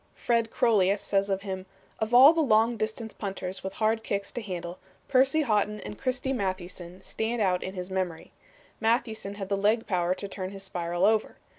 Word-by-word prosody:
Fred 230 Hz, -1 st, +1 dB
Crolius 205 Hz, -4 st, +2 dB
says 200 Hz, 0 st, +1 dB
of 195 Hz, 0 st, -1 dB
him: 190 Hz, -2 st, -5 dB, 0.3 s
"Of 220 Hz, +1 st, -2 dB
all 260 Hz, +6 st, +9 dB
the 330 Hz, -, +1 dB
long 230 Hz, -3 st, +3 dB
distance 220 Hz, 0 st, -3 dB
punters 190 Hz, -2 st, -5 dB
with 190 Hz, 0 st, -4 dB
hard 220 Hz, +2 st, +1 dB
kicks 200 Hz, -1 st, -2 dB
to 240 Hz, -, -5 dB
handle, 180 Hz, -3 st, -6 dB, 0.3 s
Percy 270 Hz, +4 st, +4 dB
Haughton 210 Hz, -3 st, +1 dB
and 210 Hz, -, -7 dB
Christy 260 Hz, +2 st, -1 dB
Mathewson 185 Hz, -4 st, -4 dB
stand 230 Hz, +2 st, -2 dB
out 185 Hz, -4 st, +2 dB
in 190 Hz, -, -5 dB
his 180 Hz, 0 st, -5 dB
memory. 185 Hz, -4 st, -3 dB, 0.5 s
Mathewson 225 Hz, -3 st, 0 dB
had 195 Hz, -2 st, -5 dB
the 200 Hz, -, +2 dB
leg 215 Hz, +3 st, +2 dB
power 180 Hz, -1 st, 0 dB
to 200 Hz, -, -6 dB
turn 190 Hz, -1 st, -5 dB
his 195 Hz, 0 st, -8 dB
spiral 175 Hz, -2 st, -1 dB
over. 220 Hz, 0 st, +1 dB
205 Hz, 185 wpm, -27 LUFS, 185-225 Hz, 0.5 s, all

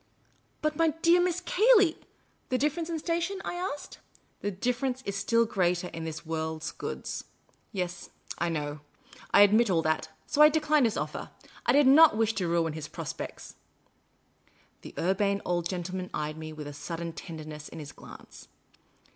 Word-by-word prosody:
" -, -, -39 dB
But, 305 Hz, 0 st, +1 dB
my 330 Hz, -, +4 dB, 0.2 s
dear 345 Hz, +1 st, +6 dB
Miss 360 Hz, 0 st, 0 dB
Cayley 405 Hz, -3 st, +5 dB, 0.2 s
" -, -, -38 dB
" -, -, -40 dB
The 255 Hz, -, +2 dB
difference 305 Hz, +5 st, -1 dB
in 330 Hz, -, -1 dB
station? 340 Hz, +4 st, -1 dB
" -, -, -10 dB
I 355 Hz, +2 st, -2 dB
said; -, -, -12 dB, 0.2 s
" -, -, -40 dB
the 205 Hz, -, -1 dB
difference, 250 Hz, +6 st, -2 dB
still 230 Hz, +4 st, +2 dB
greater, 180 Hz, -4 st, 0 dB
in 165 Hz, 0 st, -6 dB
this 160 Hz, +1 st, -6 dB
world's 160 Hz, -1 st, -3 dB
goods? -, -, -5 dB, 0.5 s
Yes, 180 Hz, -3 st, -4 dB, 0.3 s
I 170 Hz, -, +1 dB
know. 150 Hz, -2 st, -3 dB, 0.5 s
I 200 Hz, -, +8 dB
admit 215 Hz, +3 st, +5 dB
all 165 Hz, -3 st, +2 dB
that. 155 Hz, 0 st, 0 dB, 0.2 s
So 295 Hz, -, +1 dB
I 300 Hz, -, +10 dB
declined 305 Hz, -4 st, +3 dB
his 220 Hz, -, -2 dB
oflfer. -, -, -4 dB, 0.4 s
I -, -, +6 dB
did 285 Hz, +1 st, +6 dB
not 280 Hz, -2 st, +7 dB
wish 225 Hz, 0 st, +2 dB
to 180 Hz, -, 0 dB
ruin 165 Hz, -2 st, +1 dB
his 155 Hz, -1 st, -6 dB
prospects. 165 Hz, 0 st, -7 dB, 0.5 s
' -, -, -41 dB
' -, -, -35 dB
The -, -, -11 dB
Urbane 200 Hz, +2 st, +1 dB
Old 175 Hz, -1 st, 0 dB
Gentleman 185 Hz, 0 st, -4 dB
eyed 150 Hz, 0 st, -3 dB
me 155 Hz, 0 st, -7 dB
with 155 Hz, -1 st, -7 dB
a 145 Hz, -, -7 dB
sudden 165 Hz, +3 st, -5 dB
tender 160 Hz, -2 st, -8 dB
ness 150 Hz, -1 st, -8 dB
in -, -, -10 dB
his 150 Hz, -2 st, -7 dB
glance. -, -, -13 dB
190 Hz, 190 wpm, -29 LUFS, -, 0.5 s, I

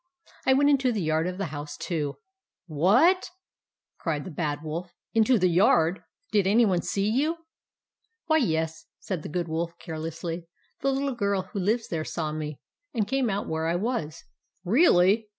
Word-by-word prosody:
I 265 Hz, -, +6 dB
went 285 Hz, +2 st, +4 dB
into 270 Hz, -3 st, +3 dB
the 210 Hz, -6 st, -1 dB
yard 155 Hz, +2 st, +1 dB
of 180 Hz, 0 st, -4 dB
the 195 Hz, -, -2 dB
house, 145 Hz, 0 st, -6 dB
too." 150 Hz, -5 st, -2 dB, 0.5 s
11 155 Hz, -4 st, -8 dB
Wha 240 Hz, -, +6 dB
a -, -, +4 dB
t? -, -, -7 dB, 0.4 s
" -, -, -62 dB
cried 150 Hz, -4 st, -2 dB
the 185 Hz, -, -7 dB
Bad 150 Hz, -2 st, -2 dB
Wolf. 170 Hz, +3 st, -5 dB
" -, -, -64 dB
Into 225 Hz, +2 st, +4 dB
the 185 Hz, -2 st, +3 dB
yard! 175 Hz, -1 st, +3 dB, 0.3 s
Did 205 Hz, -3 st, +3 dB
any 225 Hz, +4 st, +5 dB
one 180 Hz, -4 st, +2 dB
see 200 Hz, 0 st, -1 dB
you? 290 Hz, +9 st, +1 dB, 0.3 s
" -, -, -66 dB
" 455 Hz, 0 st, -50 dB
Why, 315 Hz, -1 st, +3 dB
yes," 160 Hz, -, -1 dB
said 185 Hz, -5 st, -4 dB
the -, -, -7 dB
Good 175 Hz, +2 st, -2 dB
Wolf, 170 Hz, +1 st, -3 dB
care 160 Hz, -2 st, -7 dB
lessly. 165 Hz, +1 st, -5 dB, 0.2 s
" -, -, -41 dB
The 275 Hz, -, +2 dB
little 275 Hz, 0 st, -1 dB
girl 200 Hz, -4 st, 0 dB
who 200 Hz, -, -2 dB
lives 220 Hz, +5 st, 0 dB
there 160 Hz, -2 st, -2 dB
saw 155 Hz, -1 st, -3 dB
me, 150 Hz, -1 st, -5 dB, 0.4 s
and 215 Hz, -3 st, +1 dB
came 265 Hz, -2 st, +1 dB
out 200 Hz, 0 st, -2 dB
where 160 Hz, 0 st, -1 dB
I 170 Hz, -, +1 dB
was." 180 Hz, -6 st, -2 dB, 0.2 s
" 185 Hz, -, -45 dB
Really 215 Hz, -, +4 dB
180 Hz, 210 wpm, -27 LUFS, 160-230 Hz, 0.5 s, I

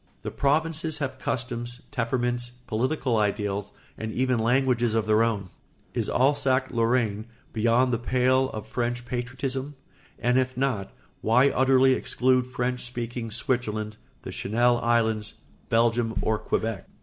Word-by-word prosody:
The -, -, -4 dB
provinces 160 Hz, +2 st, 0 dB
have 140 Hz, -3 st, -4 dB
customs, 120 Hz, 0 st, -3 dB
temperaments, 120 Hz, -1 st, -1 dB
political 125 Hz, +2 st, 0 dB
ideals, 105 Hz, -1 st, -1 dB, 0.3 s
and 110 Hz, 0 st, -3 dB
even 130 Hz, 0 st, +1 dB
languages 120 Hz, -1 st, +2 dB
of 110 Hz, -1 st, +1 dB
their 110 Hz, +1 st, +3 dB
own. 105 Hz, -5 st, 0 dB, 0.4 s
Is -, -, -1 dB
Alsace 135 Hz, -1 st, +2 dB
Lorraine 115 Hz, -2 st, +1 dB, 0.3 s
beyond 120 Hz, +3 st, +3 dB
the 115 Hz, -, +1 dB
pale 130 Hz, +2 st, +2 dB
of 110 Hz, -4 st, -6 dB
French 120 Hz, 0 st, -2 dB
patriotism? 130 Hz, +3 st, -3 dB, 0.4 s
And 125 Hz, +1 st, +2 dB
if 130 Hz, -1 st, -1 dB
not, 125 Hz, -7 st, -1 dB, 0.3 s
why 125 Hz, +5 st, +4 dB
utterly 130 Hz, 0 st, +4 dB
exclude 130 Hz, 0 st, +1 dB
French 125 Hz, 0 st, -2 dB
speaking 120 Hz, -1 st, -4 dB
Switzerland, 110 Hz, -2 st, -2 dB, 0.3 s
the -, -, -6 dB
Channel 120 Hz, +3 st, +2 dB
Islands, 110 Hz, -3 st, +1 dB, 0.3 s
Belgium, 115 Hz, 0 st, +2 dB
or 110 Hz, -1 st, +1 dB
Quebec? 110 Hz, -3 st, -2 dB
120 Hz, 130 wpm, -26 LUFS, 115-130 Hz, 0.4 s, why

